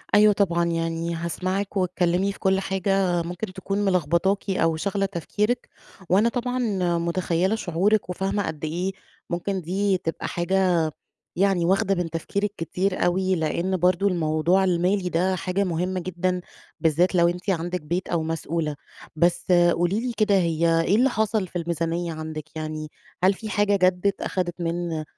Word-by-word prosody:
أيوة 210 0 +7
طبعًا، 170 -4 +1
يعني 165 0 -1
هاسمعِك 185 +4 -2
واتكلمي 180 +1 +1
في - - -12
كُلّ 190 0 +2
حاجة 190 -2 +1
ممكن 180 +3 -5
تكون 195 +2 -3
ملخبطاكِ 185 +3 +1
أو 165 -4 +2
شاغلة 195 +4 -1
تفكيرِك، 210 +6 -2 0.4
وأنا 205 +6 +4
طبعًا 250 +1 -2 0.4
متخيلة 175 +3 0
شعورِك 195 +2 +1
وفاهمة 195 +3 -1
قدّ 155 0 -4
إيه 175 +5 -2 0.4
ممكن 185 +2 -2
دي 190 +3 0
تبقى 165 -2 -4
حاجة 175 -2 +1 0.5
يعني 190 -2 +2
واخدة 195 +2 +2
من 175 -2 -2
تفكيرِك 200 +5 -2
كتير 180 +4 -1
أوي، 185 +1 +2
لأن 170 +3 0
برضو 180 +2 +2
الموضوع 170 +1 +2
المالي 180 +1 +1
ده 180 +2 +1
حاجة 185 +2 -1
مُهمة 180 +1 -1
جدًا، 180 +1 -1 0.4
بالذات 165 +3 +2
لو 170 -1 +5
أنتِ 180 +3 -2
عندِك 175 0 -1
بيت 170 +5 -2
أو 170 -2 0
مسؤولة. 160 -1 -2 0.4
بس 175 +3 +2 0.2
قولي 175 +5 +1
لي 245 +1 -2
كده 210 -2 +3
هي 165 -2 +2
إيه 180 +5 +2
اللي 255 +4 +4
حصل 220 -3 0
في 175 - -11
الميزانية 170 0 -2
عندِك، 155 0 -7
يعني 155 0 -4 0.4
هل 190 +1 +5
في 220 +2 -7
حاجة 205 0 +2
جدّت 185 +2 +1
أخدِت 180 -3 -2
من 170 -2 -2
180 Hz, 155 wpm, -24 LUFS, 170-195 Hz, 0.5 s, أيوة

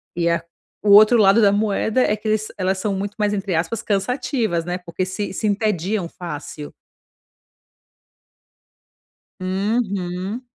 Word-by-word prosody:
E 170 -1 +1
a 170 - +1 0.4
o 210 - 0
outro 215 +4 +8
lado 205 +1 +5
da 200 -2 +5
moeda 215 +3 +1
é, 210 - +1
que 215 +1 -8
eles 215 0 0
elas 190 +1 0
são 200 +1 -2
muito 200 +1 -4
mais, 210 -1 +1
entre 195 -3 -2
aspas, 175 +7 -1
cansativas, 225 - -1
né, 175 0 -2
porque 180 0 -4
se 190 +2 -4
se 215 - -2
entediam 205 -2 0
fácil. 150 -3 -8 2.7
Uhum. 195 +1 -2
200 Hz, 135 wpm, -21 LUFS, 185-215 Hz, 2.7 s, outro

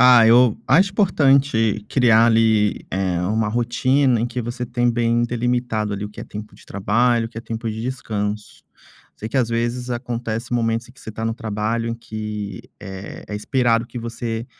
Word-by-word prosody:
Ah, 125 -2 +8
eu 120 0 +5
acho 185 +9 +4
importante 135 - +2
criar, 115 -3 +5
ali, 110 -2 +2
eh, 95 -2 -1
uma 110 +4 0
rotina 120 +2 +2
em 115 - 0
que 120 +1 -4
você 120 +1 -4
tem 120 0 +1
bem 120 0 +1
delimitado, 120 -3 -1
ali, 100 +1 -4
o - - -5
que - - -10
é - - -6
tempo 105 +1 -9
de - - -18
trabalho, 115 +4 +1
o - - -10
que 115 - -21
é - - -5
tempo 115 0 -5
de 110 +1 -5
descanso. 105 -4 -4 0.5
Sei 110 - -6
que, - - -3
às 125 -4 +2
vezes, 120 +2 -2
acontece 120 -1 -4
momentos 115 0 0
em - - -15
que 130 - -18
você - - -11
está 110 +1 -5
no 115 0 -1
trabalho 115 +1 -2
que, 105 -3 -6 0.2
eh, 95 -1 -8
é 105 - -5
esperado 115 +1 +1
que 120 +1 -8
você 115 0 -4
115 Hz, 190 wpm, -21 LUFS, 110-120 Hz, 0.5 s, Ah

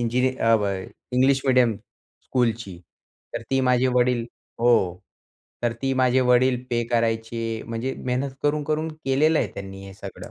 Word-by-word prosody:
इंजिनि 125 +2 +1 0.2
अब 110 -2 +4 0.5
English 130 +2 +3
medium 125 -3 +4
स्कूलची. 115 -5 -4 0.6
तर - - -3
ती 135 0 +2
माझे 125 0 +3
वडील 125 -1 +2 0.4
हो, 115 -7 +3 0.7
तर 120 -1 +1
ती 135 0 +1
माझे 130 0 +3
वडील 125 0 +4
पे 120 0 +1
करायचे. 115 -1 -1
म्हणजे 115 +3 -3
मेहनत 130 +2 -1
करून-करून 150 +2 0 0.2
केलेलं 150 +4 +3
आहे - - 0
त्यांनी 95 0 -8
हे 95 - -11
सगळं. - - -9
125 Hz, 140 wpm, -24 LUFS, 115-130 Hz, 0.7 s, अब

